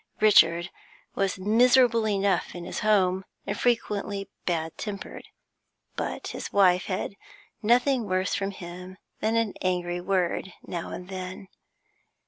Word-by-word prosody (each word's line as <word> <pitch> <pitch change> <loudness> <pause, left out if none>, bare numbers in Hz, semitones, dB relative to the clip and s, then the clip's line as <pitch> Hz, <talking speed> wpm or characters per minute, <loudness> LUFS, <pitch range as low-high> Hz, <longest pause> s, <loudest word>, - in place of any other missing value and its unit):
Richard 175 -5 +5 0.4
was 195 -1 0
miserable 230 +3 +4
enough 195 -4 0
in 175 -1 -6
his 180 - -4
home, 190 -3 +2 0.2
and 200 - -2
frequently 205 -4 -1 0.2
bad 165 -2 -1
tempered, 205 -2 -7 0.7
but - - -4
his - - -6
wife 185 -2 +4
had 190 +1 -3 0.5
nothing 245 +1 +3
worse 185 0 0
from 195 0 -1
him 180 0 -9 0.2
than 220 +1 0
an 230 -3 +1
angry 175 -1 -1
word 185 0 -1
now 170 -2 -5
and 180 - -7
then. 185 0 -7
195 Hz, 125 wpm, -27 LUFS, 180-215 Hz, 0.7 s, Richard